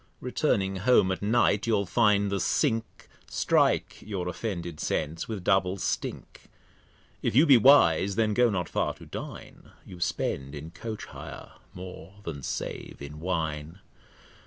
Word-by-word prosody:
Returning 95 0 0
Home 95 -2 +4
at 95 - -3
Night, 105 -1 +2
you'll 105 -3 +2
find 100 -1 +3
the 100 - 0
Sink 115 +5 -1 0.2
Strike - - +1
your 95 -4 -4
offended 85 -5 -4
Sense 80 +1 -2
with 105 -5 -5
double 95 0 +2
Stink. - - -4 0.8
If - - -1
you 145 +6 +7
be 140 -5 +8
wise, 100 - +5
then 110 -1 +2
go 125 +1 +4
not 90 -6 -1
far - - -1
to - - -13
Dine, - - -9 0.2
You 90 - -11
spend 70 -4 -2
in 75 +3 -8
Coach 110 +5 -6
hire - - -10 0.2
more 90 0 -9
than 75 -6 -6
save - - -5
in 70 +2 -8
Wine. 80 -2 -3
95 Hz, 145 wpm, -28 LUFS, 85-110 Hz, 0.8 s, be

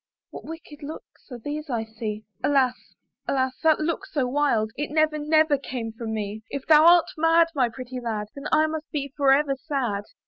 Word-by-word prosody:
What - - -9
wicked 320 -2 -10
looks 295 +2 -10
are 245 - -6
those 295 +5 -6
I 235 -3 -1
see? 220 -1 -6 0.2
Alas! 270 -3 +3 0.5
alas! 260 -1 +1
that 320 -2 +4
look 335 +4 -2
so 290 -8 -1
wild, 245 -5 +1
It 295 - -3
never, 310 0 +2
never 305 -1 +3
came 245 -4 -5
from 225 0 -6
me: 210 0 -4
If 280 -1 -5
thou 310 +1 +7
art 345 -1 +7
mad, 330 +1 +4
my 255 -5 +2
pretty 255 +1 -7
lad, 215 -3 -3
Then 280 0 -9
I 310 - +4
must 315 0 -4
be 280 -3 -4
for 280 -2 +3
ever 275 0 +3
sad. 255 -8 -2
280 Hz, 195 wpm, -25 LUFS, 240-310 Hz, 0.5 s, thou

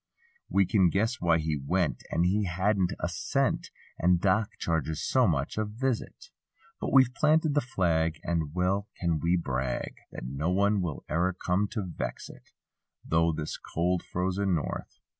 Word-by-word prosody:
We 100 - +3
can 95 -1 +4
guess 110 +8 0
why 85 -1 +4
he 80 -1 -1
went. 90 +3 0
As - - +1
he 100 +4 +2
hadn't 95 +1 +1
a - - -1
cent 85 - -1 0.3
And 90 0 +4
Doc 100 +3 +1
charges 80 -1 -1
so 130 -3 +4
much 70 +4 -1
a - - +2
visit. 115 +3 -3 0.5
But - - -3
we've 130 -2 +5
planted 155 +2 +3
the 145 - +3
flag. 80 - 0
And 80 -3 -2
well 95 +3 +1
can 85 -3 0
we 85 +3 +2
brag. 65 -6 -2
That - - -7
no 70 +6 -2
one 100 +2 +2
will 85 -5 -4
e'er 90 +3 +1
come 90 +3 0
to 105 - -2
vex 85 - -5
it; - - -18 0.6
Though 80 +1 +3
this 75 -1 -4
cold 90 +1 -1
frozen 95 +1 -1
north. 80 - -4
90 Hz, 165 wpm, -28 LUFS, 80-100 Hz, 0.6 s, we've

